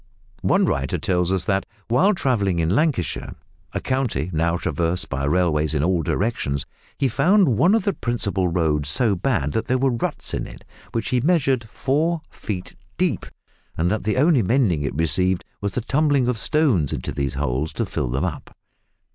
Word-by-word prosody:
One - - +3
writer 70 -1 -1
tells 90 -4 0
us 95 -1 0
that, 95 -1 +1 0.2
while 160 - +3
travelling 105 - +1
in 80 0 +1
Lancashire, 135 - 0 0.4
a - - -2
county 120 - -1
now 85 +2 +1
traversed 85 +1 -1
by 70 0 -2
railways 80 -1 +1
in 75 - +1
all 90 0 +2
directions, 75 - -1 0.3
he 135 - +2
found 170 - +3
one 180 - +4
of 225 - +1
the 200 - +1
principal 105 - -1
roads 80 -4 0
so 105 +5 +3
bad 90 - 0
that 110 - -2
there 130 - +2
were 135 +1 +2
ruts 115 - -2
in - - -2
it, - - -13 0.3
which 115 - -2
he 125 -2 +1
measured, 135 -7 +1
four 155 +7 0
feet 95 -4 -6 0.2
deep, 180 -5 0 0.5
and 85 +3 +1
that 110 - -1
the 110 +3 0
only 145 -1 +4
mending 105 - +2
it 70 -1 -3
received 90 +4 +1 0.2
was 100 -1 -2
the 125 - -1
tumbling 140 0 +2
of 125 -3 0
stones 125 - +2
into - - -3
these 70 -1 -2
holes 65 +6 -1
to - - -1
fill - - -2
them 65 +3 -1
up. - - -6
100 Hz, 180 wpm, -22 LUFS, 80-135 Hz, 0.5 s, one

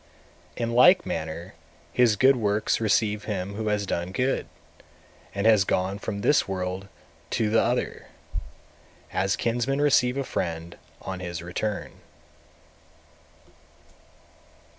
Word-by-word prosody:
220. - - -3
In - - -3
like 180 +8 +7
manner 80 +3 -4 0.4
his 120 -4 +4
good 135 +6 +5
works 105 -1 0
receive 105 0 +1
him 100 -2 -3
who 110 +1 -4
has 105 -1 0
done 85 -1 -2
good, 130 +7 0 0.9
and 100 +1 -1
has 110 -3 +6
gone 95 +1 -1
from 100 -1 -4
this 145 - +3
world 95 0 -3 0.4
to 110 -2 0
the 115 - +4
other; 120 +2 -1 1.1
as 95 +1 +1
kinsmen 120 +4 0
receive 135 -3 +3
a 140 - 0
friend 85 -7 -4 0.3
on 95 -1 -5
his 85 -1 -5
return. 100 +4 -4
105 Hz, 120 wpm, -26 LUFS, 95-120 Hz, 1.1 s, like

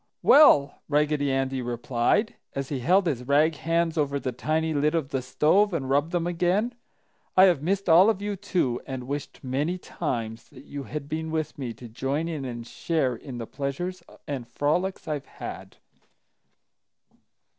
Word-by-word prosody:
"Well," 145 - +6
Raggedy 145 -1 +2
Andy 135 0 0
replied, 120 - 0 0.2
as 135 -1 -3
he 140 - -2
held 185 +9 +3
his 135 -7 -1
rag 150 +3 +4
hands 165 0 0
over 140 -1 0
the 130 - -3
tiny 160 +6 -1
lid 150 +2 +1
of 155 -5 -1
the 135 -2 -1
stove 185 +9 +2
and 135 -4 -2
rubbed 145 +4 +2
them 175 -2 0
again, 180 +7 +1 0.6
"I 185 - +9
have 175 -7 +5
missed 195 +5 -1
all 180 +5 +7
of 215 -4 +1
you, 205 0 -3
too, 175 -10 -1
and 130 -2 -5
wished 145 +1 -5
many 145 +7 -1
times 115 -11 -4
that 135 -1 -14
you 140 -1 -6
had 145 +5 -6
been 160 +1 -3
with 160 -1 -2
me 125 -4 -3
to 120 +2 -10
join 135 +7 -2
in 155 -5 -4
and 120 -2 -6
share 135 -1 -1
in 125 +2 -8
the 115 - -4
pleasures 150 +9 -4 0.3
and 135 -5 -4
frolics 175 +10 -1
I've 150 -3 -3
had." - - -8
150 Hz, 170 wpm, -26 LUFS, 135-170 Hz, 0.6 s, I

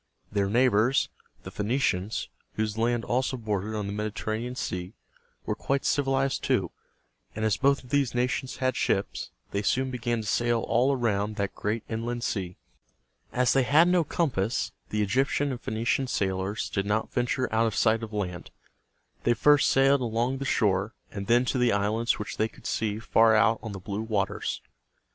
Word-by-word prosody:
Their 100 -1 +1
neighbors, 120 +2 +3 0.3
the - - -8
Phoe - - -5
ni´ 115 +5 0
cians, 105 -6 0 0.3
whose 110 -1 -2
land 115 +1 0
also 130 +1 0
bordered 110 -2 -2
on 105 -1 -2
the 100 - -4
Mediterranean 110 +3 -3
Sea, 90 -3 -4 0.5
were - - 0
quite 140 0 -1
civilized 135 -1 +1
too; - - +1 0.6
and 110 +1 -1
as 110 - +2
both 140 +1 +2
of 125 - -15
these 140 -4 +1
nations 125 +2 -1
had 130 0 0
ships, 95 - -1 0.2
they 100 - -1
soon 130 +5 0
began 120 -2 -1
to - - -8
sail 120 +1 +1
all 120 +5 +2
around 110 -5 0
that 100 -1 -2
great 105 +2 -2
inland 115 +1 -3
sea. 95 -6 -3 0.7
As 125 -1 +2
they 135 - +4
had 150 +6 +5
no 180 -1 +3
compass, 125 - -1 0.2
the 105 0 0
Egyptian 135 +6 +1
and 125 - -5
Phoenician 115 +4 0
sailors 95 -1 -2
did 100 0 -1
not 105 +2 -1
venture 125 +1 0
out 115 +1 +3
of 110 - -3
sight 110 0 +3
of 110 -1 -6
land. 90 -5 -4 0.7
They 120 - +3
first 145 +4 +5
sailed 135 0 +4
along 120 +3 -1
the 135 - -3
shore, 100 -3 +1 0.2
and 100 -1 -6
then 120 +2 +4
to 125 - 0
the 125 -2 +3
islands 105 +4 +1
which 105 - -6
they 110 - +2
could - - -19
see 105 -2 -1
far 110 0 +4
out 115 +1 +4
on 110 - -6
the 100 - -6
blue 100 +3 -4
waters. 105 -3 -2
115 Hz, 180 wpm, -27 LUFS, 105-130 Hz, 0.7 s, had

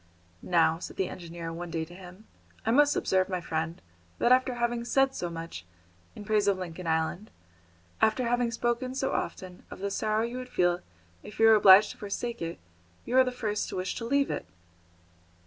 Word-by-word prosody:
"Now," 165 -2 +2
said - - -8
the 190 - 0
engineer 170 -1 -7
one 175 +1 -6
day 165 -1 -2
to 175 - -14
him, 185 +3 -13 0.4
"I 225 - +2
must 290 +3 +4
observe, 190 0 +1
my 185 -1 -1
friend, 165 0 -3 0.4
that 240 - +2
after 255 0 +4
having 240 0 -1
said 270 +2 +2
so 175 - -3
much, 165 - -7 0.5
in 205 - -9
praise 210 -1 +2
of 200 -2 +3
Lincoln 180 -1 -6
Island, 160 +6 -1 0.7
after 220 +3 +3
having 245 0 +1
spoken 240 +2 -2
so 265 0 -1
often 180 -1 -4
of - - -9
the 200 +1 -3
sorrow 215 +2 0
you 235 +2 -4
would 255 0 -7
feel 175 -4 +1 0.4
if 210 - -11
you 225 - +6
were 225 - +8
obliged 200 -1 +7
to - - -13
forsake 230 +3 -4
it, 165 0 -4 0.5
you 245 - -2
are 260 - +7
the 255 - -2
first 215 -4 -2
to - - -6
wish 185 0 -2
to 230 - -4
leave 280 +3 +1
it." - - -4
205 Hz, 200 wpm, -28 LUFS, 175-240 Hz, 0.7 s, were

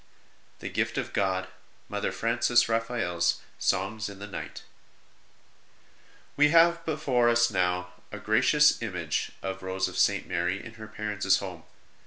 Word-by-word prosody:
The - - -4
Gift - - -1
of - - -3
God: 95 -1 0 0.4
MOTHKR - - -2
FRANCES 120 -1 +2
RAPHAEL 115 -5 -1
S 85 - +2 0.2
Songs 105 +3 -1
in 100 - -10
the 100 - -7
Night? 105 - -7 1.8
|E 150 - +7
have 170 +2 +5
now - - -19
before 135 -6 +1
us 120 0 +3
a 90 +2 -2
gracious 130 +9 +3
image 90 -9 -3
of 95 0 -4
Rose 95 0 -1
of - - -5
St. - - +2
Mary 90 +3 -1
in 115 - -10
her 110 - -7
parents 105 -2 0
home. 90 -5 -7
105 Hz, 145 wpm, -27 LUFS, 95-120 Hz, 1.8 s, |E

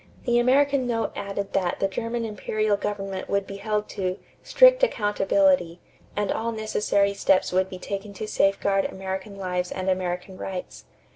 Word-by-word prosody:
The 240 -1 +3
American 270 +1 +3
note 230 -2 -1
added 200 0 -4
that 180 -2 0
the 195 - +2
German 230 +4 -3
imperial 215 0 0
government 195 -2 -4
would 200 0 +1
be 195 - -7
held 210 +1 -2
to 185 -2 -2 0.2
"strict - - +6
accountability" 210 - +2 0.4
and 205 -1 0
all 230 +1 -1
necessary 210 -2 +1
steps 195 -1 +2
would 185 +1 +2
be 185 - -7
taken 200 +2 -5
to 215 +2 -6
safeguard 195 -1 +2
American 190 +1 -5
lives 180 -2 -2
and 190 0 -1
American 185 0 -3
rights. 185 -1 -6
200 Hz, 155 wpm, -25 LUFS, 190-220 Hz, 0.4 s, strict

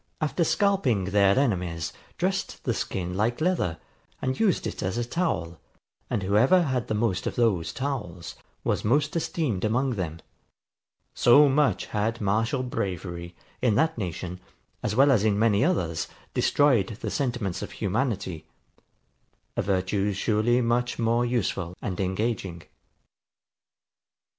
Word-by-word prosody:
] - - -42
after 155 +3 +1
scalping 160 - +2
their 100 +1 +4
enemies, 90 - 0 0.2
dressed - - -2
the - - 0
skin 90 -1 -3
like 110 +5 0
leather, 155 - 0 0.4
and 130 0 -2
used 205 -5 +2
it - - -4
as 95 +4 -2
a 120 - 0
towel; 120 - -2 0.5
and 95 - -1
whoever 120 - +4
had 130 -6 -1
the 110 - -1
most 105 -4 0
of - - -3
those 105 -9 +1
towels 105 -12 -4 0.3
was - - 0
most 145 +7 +1
esteemed 150 - -1
among 125 +5 +1
them. 85 -7 -3 0.9
So 145 +5 +6
much 140 +1 +2
had 110 +3 -1
martial 115 +6 0
bravery, 85 -6 -4 0.3
in 120 -5 +3
that 160 +8 +2
nation, 90 -3 -5 0.4
as 105 - -1
well 140 +3 +6
as 110 -6 +3
in 105 -2 +2
many 105 0 +3
others, 85 - 0 0.3
destroyed 130 -10 +3
the - - -3
sentiments 120 -9 -2
of - - -6
humanity; 100 - -2 1.1
a - - +1
virtue 100 +2 0
surely 110 +5 +2
much 120 +1 0
more 115 +1 +2
useful 95 -7 -1
and 95 0 -4
engaging. 95 -3 -2
110 Hz, 140 wpm, -26 LUFS, 95-130 Hz, 1.1 s, So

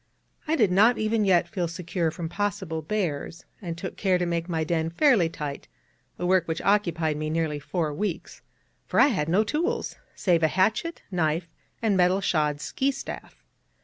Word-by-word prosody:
I 315 - +2
did 215 - +3
not 220 +6 +5
even 215 0 +1
yet 185 -3 +4
feel 180 -6 -2
secure 170 0 -2
from 165 +1 -5
possible 195 -3 -2
bears, 165 -3 -3 0.2
and 170 -4 -5
took - - -6
care 190 -3 +2
to 180 - -1
make 170 0 -2
my 160 -2 0
den 160 0 0
fairly 195 - +3
tight, 150 -3 -6 0.5
a 175 - -3
work 180 -1 +3
which 160 0 -2
occupied 170 -7 +1
me 155 0 -3
nearly 155 -2 -1
four 155 +1 -2
weeks, 180 +2 -4 0.5
for - - +1
I - - +7
had 165 - -1
no 190 +6 +4
tools, 345 - -2 0.2
save 175 -4 +2
a 160 - +4
hatchet, 220 - 0
knife, 165 -1 0 0.4
and 215 -3 +3
metal 180 +1 +3
shod 150 -6 0
ski 270 - -1
staff. 275 0 -7
175 Hz, 180 wpm, -26 LUFS, 160-205 Hz, 0.5 s, I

